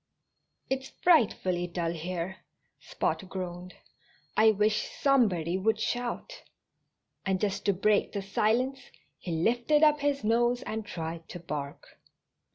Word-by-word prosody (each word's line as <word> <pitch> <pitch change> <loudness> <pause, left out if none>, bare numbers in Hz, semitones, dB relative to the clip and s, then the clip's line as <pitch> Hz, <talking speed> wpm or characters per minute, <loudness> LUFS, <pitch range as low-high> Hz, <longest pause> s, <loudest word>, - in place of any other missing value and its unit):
"It's 265 0 -2
frightfully 190 - +2
dull 170 -1 -2
here," 175 +2 -4 0.4
Spot - - -2
groaned. 180 -1 -6 0.6
"I 220 +1 +6
wish 210 0 +1
somebody 190 - +2
would 215 +2 +1
shout." 245 +1 -3 0.8
And 190 -1 0
just 200 -1 -2
to 200 - +3
break 205 +3 +2
the 200 -2 -3
silence 235 +7 +1 0.4
he 175 - -6
lifted 240 - +2
up 300 -1 +5
his 285 -2 0
nose 240 +3 +2
and 220 0 -4
tried 165 -4 -6
to 175 - -7
bark. 145 -4 -7
205 Hz, 125 wpm, -29 LUFS, 175-240 Hz, 0.8 s, I